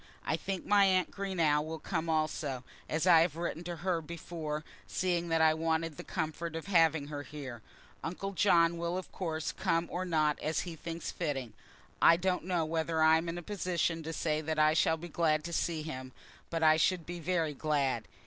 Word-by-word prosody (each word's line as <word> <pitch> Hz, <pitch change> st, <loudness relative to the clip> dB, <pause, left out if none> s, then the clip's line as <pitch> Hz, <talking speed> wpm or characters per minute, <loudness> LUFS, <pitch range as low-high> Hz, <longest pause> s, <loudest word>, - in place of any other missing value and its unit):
I -, -, +1 dB
think 195 Hz, -2 st, -4 dB
my 205 Hz, -1 st, +5 dB
aunt 185 Hz, -2 st, +2 dB
Greenow 170 Hz, -7 st, +1 dB
will 160 Hz, +1 st, -5 dB
come 160 Hz, +1 st, -3 dB
also, 155 Hz, -4 st, -1 dB, 0.3 s
as 160 Hz, +2 st, 0 dB
I 175 Hz, -3 st, +8 dB
had 165 Hz, -2 st, +1 dB
written 170 Hz, 0 st, -3 dB
to 175 Hz, 0 st, -4 dB
her 175 Hz, -3 st, +1 dB
before, 155 Hz, -1 st, -5 dB, 0.2 s
seeing 175 Hz, -2 st, -1 dB
that 165 Hz, 0 st, +2 dB
I 160 Hz, 0 st, +6 dB
wanted 160 Hz, 0 st, -1 dB
the -, -, -6 dB
comfort 160 Hz, -1 st, -3 dB
of 165 Hz, -, -5 dB
having 160 Hz, -6 st, +3 dB
her 145 Hz, -1 st, -4 dB
here. 140 Hz, -6 st, -8 dB, 0.4 s
Uncle 185 Hz, +4 st, -4 dB
John 170 Hz, -3 st, +3 dB
will 170 Hz, +1 st, -1 dB
of 185 Hz, -, -6 dB
course 160 Hz, -4 st, -3 dB
come 165 Hz, +1 st, 0 dB
or 180 Hz, -, -2 dB
not 155 Hz, -4 st, +1 dB
as 155 Hz, -, 0 dB
he 175 Hz, -3 st, -6 dB
thinks 165 Hz, +1 st, -5 dB
fitting. 135 Hz, -9 st, -3 dB, 0.5 s
I 165 Hz, -, +7 dB
don't 180 Hz, -1 st, 0 dB
know 175 Hz, -3 st, 0 dB
whether 160 Hz, 0 st, 0 dB
I 160 Hz, 0 st, +7 dB
am 165 Hz, +1 st, -2 dB
in 170 Hz, -, -4 dB
a 175 Hz, -, -6 dB
position 175 Hz, -4 st, -1 dB
to 160 Hz, +1 st, -5 dB
say 155 Hz, -1 st, -1 dB
that 155 Hz, 0 st, -2 dB
I 155 Hz, 0 st, +5 dB
shall 160 Hz, 0 st, +3 dB
be 170 Hz, +2 st, -8 dB
glad 155 Hz, -2 st, +1 dB
to 170 Hz, -, -5 dB
see 165 Hz, -2 st, -1 dB
him; 130 Hz, -4 st, -6 dB, 0.4 s
but 165 Hz, -1 st, -1 dB
I 155 Hz, 0 st, +6 dB
should 175 Hz, 0 st, +2 dB
be 175 Hz, 0 st, -6 dB
very 165 Hz, -2 st, 0 dB
glad. 145 Hz, -2 st, 0 dB
165 Hz, 205 wpm, -32 LUFS, 155-175 Hz, 0.5 s, I